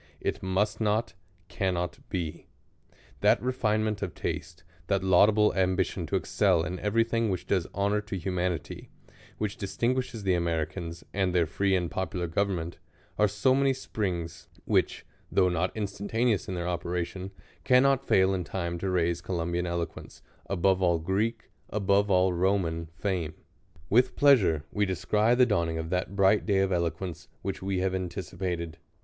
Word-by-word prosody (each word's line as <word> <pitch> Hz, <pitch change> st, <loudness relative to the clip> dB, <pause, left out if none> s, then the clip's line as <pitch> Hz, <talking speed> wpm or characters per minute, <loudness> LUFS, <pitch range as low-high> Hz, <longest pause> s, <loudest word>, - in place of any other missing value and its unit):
It -, -, -2 dB
must 100 Hz, +4 st, 0 dB
not, 110 Hz, +2 st, +1 dB, 0.3 s
cannot 90 Hz, -3 st, -2 dB
be. 85 Hz, -4 st, -4 dB, 0.7 s
That -, -, +4 dB
refinement 110 Hz, -4 st, 0 dB
of 95 Hz, -4 st, -4 dB
taste, 80 Hz, +1 st, -5 dB, 0.2 s
that 100 Hz, -2 st, +1 dB
laudable 105 Hz, +3 st, +5 dB
ambition 95 Hz, -1 st, 0 dB
to -, -, -1 dB
excel 80 Hz, -, +2 dB
in 90 Hz, +1 st, -4 dB
every 110 Hz, +2 st, +2 dB
thing 115 Hz, -1 st, 0 dB
which 95 Hz, -2 st, -2 dB
does 95 Hz, -4 st, 0 dB
honor 100 Hz, +2 st, 0 dB
to 105 Hz, -2 st, -5 dB
humanity, 90 Hz, -1 st, -3 dB, 0.5 s
which 105 Hz, 0 st, -3 dB
distinguishes 120 Hz, +3 st, -2 dB
the 95 Hz, -1 st, +2 dB
Americans, 85 Hz, 0 st, -2 dB
and 95 Hz, -2 st, 0 dB
their 85 Hz, -2 st, +4 dB
free 95 Hz, +5 st, +1 dB
and 90 Hz, -2 st, -1 dB
popular 95 Hz, -1 st, -2 dB
government, 85 Hz, -1 st, -2 dB, 0.4 s
are 105 Hz, -, +5 dB
so 105 Hz, +6 st, +2 dB
many 135 Hz, 0 st, +3 dB
springs, 90 Hz, -10 st, -4 dB, 0.2 s
which, -, -, +1 dB, 0.3 s
though 90 Hz, -2 st, +4 dB
not 90 Hz, +1 st, 0 dB
instantaneous 105 Hz, +2 st, -1 dB
in 95 Hz, -, -3 dB
their 85 Hz, 0 st, -3 dB
operation, 90 Hz, +2 st, -3 dB, 0.3 s
cannot 135 Hz, +1 st, +4 dB
foil 95 Hz, -6 st, +3 dB
in 90 Hz, -2 st, -1 dB
time 85 Hz, -1 st, -3 dB
to 95 Hz, -, -2 dB
raise 85 Hz, -1 st, +1 dB
Co 95 Hz, -, -5 dB
lumbian 85 Hz, +1 st, -1 dB
eloquence 85 Hz, -1 st, -5 dB
" -, -, -33 dB
above 95 Hz, +1 st, +3 dB
all 85 Hz, -2 st, +3 dB
Greek, 100 Hz, +8 st, -2 dB, 0.2 s
above 100 Hz, 0 st, +2 dB
all 95 Hz, -1 st, +3 dB
Roman 85 Hz, -3 st, 0 dB
fame." 85 Hz, -5 st, -2 dB, 0.5 s
With 125 Hz, +7 st, +3 dB
pleasure 100 Hz, -, +4 dB
we 105 Hz, -, 0 dB
descry 105 Hz, +5 st, +2 dB
the 125 Hz, 0 st, +6 dB
dawning 85 Hz, -7 st, 0 dB
of 80 Hz, 0 st, -4 dB
that 90 Hz, +1 st, -1 dB
bright 100 Hz, +2 st, +3 dB
day 100 Hz, -2 st, +3 dB
of 95 Hz, 0 st, +1 dB
eloquence, 85 Hz, 0 st, -2 dB, 0.2 s
which 95 Hz, -, -3 dB
we 95 Hz, -1 st, -1 dB
have 95 Hz, 0 st, 0 dB
anticipated. 90 Hz, -2 st, -4 dB
95 Hz, 155 wpm, -28 LUFS, 85-105 Hz, 0.7 s, the